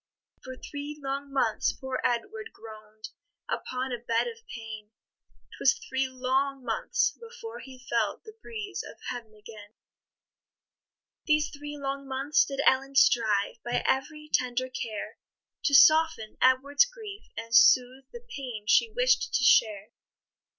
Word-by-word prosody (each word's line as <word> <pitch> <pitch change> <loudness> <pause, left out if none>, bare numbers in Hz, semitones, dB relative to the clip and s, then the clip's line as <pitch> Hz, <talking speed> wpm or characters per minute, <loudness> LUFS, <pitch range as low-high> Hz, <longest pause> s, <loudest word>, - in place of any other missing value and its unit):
For 260 0 -8
three 290 +2 -7
long 275 0 -4
months 250 -5 +1
poor 265 -1 -5
Edward 425 - -2
groan'd 215 -1 -12 0.4
Upon 255 +1 -3
a 240 - -3
bed 230 -1 0
of 460 -1 -7
pain; 220 -2 -8 0.7
'Twas 270 - +3
three 265 0 0
long 260 +1 -1
months 455 - 0
before 465 0 -10
he 255 -1 -13
felt 235 - -1
The 435 - -12
breeze 420 -3 -6
of - - -11
heaven 230 -3 -8
again. 210 0 -13 1.5
These 305 0 +2
three 295 0 -8
long 275 0 -4
months 270 +3 +2
did 275 -1 -3
Ellen 270 +1 +2
strive, 225 -4 +3
By 240 0 -1
every 300 +3 -1
tender 255 0 0
care, 225 -4 -6 0.5
To 285 - +4
soften 310 -6 +5
Edward's 270 - +4
grief, 440 -5 -10
and 230 +1 -3
soothe 255 +2 +5
The 475 0 -11
pain 245 -6 -6
she 455 - +4
wish'd - - +2
to 260 - +2
share. 215 -4 +3
265 Hz, 135 wpm, -28 LUFS, 235-300 Hz, 1.5 s, soften